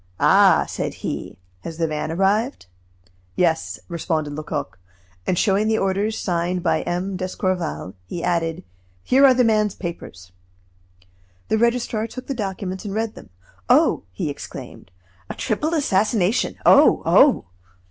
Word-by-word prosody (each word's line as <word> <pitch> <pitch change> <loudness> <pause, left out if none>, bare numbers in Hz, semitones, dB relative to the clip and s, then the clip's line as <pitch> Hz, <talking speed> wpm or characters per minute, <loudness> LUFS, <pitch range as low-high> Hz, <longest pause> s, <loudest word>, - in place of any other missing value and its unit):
"Ah!" - - +5
said - - -4
he, - - -5 0.2
"has 165 - -8
the 165 - +1
van 155 0 -3
arrived?" 200 - 0 0.7
"Yes," 165 -2 0
responded 160 -3 -2
Lecoq. 145 - -5 0.5
And 180 - +1
showing 200 +3 +2
the 220 0 +2
orders 200 +3 0
signed 175 0 -1
by 160 -3 +1
M. 185 +2 -3
d'Escorval, 185 - -3
he 170 - -5
added: 165 -2 -1 0.4
"Here 265 +2 +3
are 265 -2 +7
this 250 -1 +3
man's 215 -3 +2
papers." 95 - -8 1.2
The 220 - +2
registrar 235 -2 0
took 255 +2 -9
the 275 - -3
documents 190 -4 -4
and 205 -1 -5
read 220 0 -1
them. - - -13 0.4
"Oh!" - - +4
he 145 - -3
exclaimed, 140 -8 -10 0.4
"a - - -5
triple 305 +10 -1
assassination! 210 - +1
Oh! - - +6
oh!" 280 - +5
190 Hz, 135 wpm, -22 LUFS, 165-220 Hz, 1.2 s, are